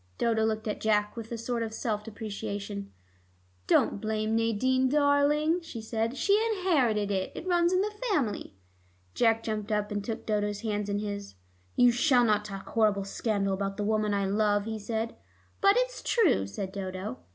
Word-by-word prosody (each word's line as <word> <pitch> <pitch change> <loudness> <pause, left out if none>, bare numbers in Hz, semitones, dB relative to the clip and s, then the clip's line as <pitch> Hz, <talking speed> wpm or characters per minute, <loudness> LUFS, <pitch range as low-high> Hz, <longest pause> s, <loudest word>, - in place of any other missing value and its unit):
Dodo 225 -1 +1
looked 220 0 -1
at 210 - -3
Jack 210 -1 +1
with 230 -1 -7
a 235 - -3
sort 235 +1 -2
of 220 -1 -3
self 215 -3 -2
deprecation. 205 -2 -5 0.8
"Don't 200 - +3
blame 215 0 -1
Nadine, 255 +4 +2
darling," 295 +3 +3
she 320 -8 -8
said. 225 +3 -2
"She 410 - +3
inherited 250 - +1
it; 190 -1 -1
it - - -6
runs 350 -1 +3
in 370 0 +3
the 420 +1 -2 0.2
family." 255 - -1 0.6
Jack 225 -1 +2
jumped 215 -1 -3
up, 210 0 0
and 205 -1 -2
took 225 +1 -5
Dodo's 205 -1 -1
hands 210 -2 -2
in 200 - 0
his. 205 - -5 0.4
"You 245 0 +6
shall 245 0 +4
not 210 -1 +2
talk 195 -2 -7
horrible 210 -3 +2
scandal 200 -1 -1
about 195 0 -3
the 210 - -1
woman 215 0 +1
I 200 -1 +1
love," 205 +1 +1
he 220 -1 -4
said. 225 +2 -3 0.5
"But 395 0 +6
it's - - 0
true," 355 - +2
said 190 - -5
Dodo. 185 -7 -5
220 Hz, 175 wpm, -29 LUFS, 205-245 Hz, 0.8 s, You